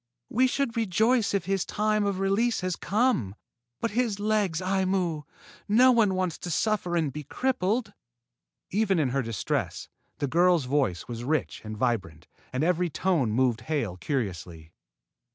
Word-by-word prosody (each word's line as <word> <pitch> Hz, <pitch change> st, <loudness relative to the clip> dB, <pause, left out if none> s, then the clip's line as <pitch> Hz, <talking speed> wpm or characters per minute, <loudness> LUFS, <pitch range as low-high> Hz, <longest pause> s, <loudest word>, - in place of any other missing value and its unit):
We 255 Hz, +3 st, +3 dB
should 255 Hz, -2 st, -1 dB
rejoice 225 Hz, +2 st, +2 dB
if 190 Hz, -4 st, -1 dB
his 195 Hz, -1 st, 0 dB
time 215 Hz, 0 st, 0 dB
of 195 Hz, -2 st, -1 dB
release 205 Hz, +5 st, +1 dB
had 185 Hz, -1 st, -2 dB
come. 200 Hz, -, +1 dB, 0.4 s
But 230 Hz, -, -1 dB
his 225 Hz, -3 st, 0 dB
legs, 205 Hz, -5 st, +1 dB
Aimu! 185 Hz, -4 st, 0 dB, 0.4 s
No 245 Hz, +5 st, +6 dB
one 220 Hz, -6 st, +3 dB
wants 185 Hz, -3 st, -1 dB
to 175 Hz, -, -6 dB
suffer 180 Hz, +1 st, 0 dB
and 155 Hz, -5 st, 0 dB
be 150 Hz, -, -6 dB
crippled." 220 Hz, -, -1 dB, 0.8 s
Even 200 Hz, -1 st, +2 dB
in 150 Hz, -5 st, +2 dB
her 135 Hz, +2 st, 0 dB
distress, 115 Hz, -6 st, -3 dB, 0.3 s
the -, -, -1 dB
girl's 170 Hz, +1 st, +3 dB
voice 130 Hz, -10 st, 0 dB
was 120 Hz, -1 st, -6 dB
rich 155 Hz, +4 st, -1 dB
and 110 Hz, 0 st, -6 dB
vibrant, 95 Hz, -10 st, -2 dB, 0.3 s
and 130 Hz, +3 st, -1 dB
every 180 Hz, +1 st, +1 dB
tone 165 Hz, -6 st, +1 dB
moved 120 Hz, +1 st, +1 dB
Hale 120 Hz, -, -2 dB
curiously. 90 Hz, -, -4 dB
180 Hz, 150 wpm, -27 LUFS, 130-210 Hz, 0.8 s, No